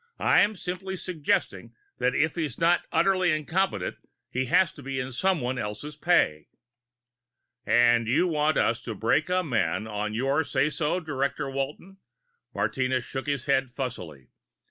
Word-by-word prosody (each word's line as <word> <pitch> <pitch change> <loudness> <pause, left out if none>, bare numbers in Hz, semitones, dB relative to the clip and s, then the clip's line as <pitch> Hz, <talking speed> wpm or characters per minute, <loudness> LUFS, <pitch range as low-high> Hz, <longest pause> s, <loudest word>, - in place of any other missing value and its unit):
"I'm 210 +1 +3
simply 185 +1 -5
suggesting 170 -5 -2 0.2
that 125 +1 +1
if 155 +1 +2
he's 155 -8 -3
not 170 +1 +2
utterly 185 +2 +3
incompetent 155 - -1 0.3
he 130 0 -2
must 165 -4 +2
be 135 0 -3
in 130 +1 -4
someone 130 -3 0
else's 110 +8 -5
pay." 150 - +2 1.2
"And 120 -1 +4
you 155 +10 +3
want 155 -2 +1
us 115 0 +1
to 115 - -6
break 115 - +1
a 185 0 +2
man 110 - 0
on 105 0 -3
your 135 +6 +1
say 145 0 0
so, 155 +3 0
Director 140 -2 -2
Walton?" 145 +8 -5 0.5
Martinez 125 +5 -1
shook 135 +1 -5
his 140 -4 -1
head 135 -2 +2
fussily. 90 - -6
140 Hz, 145 wpm, -27 LUFS, 120-165 Hz, 1.2 s, And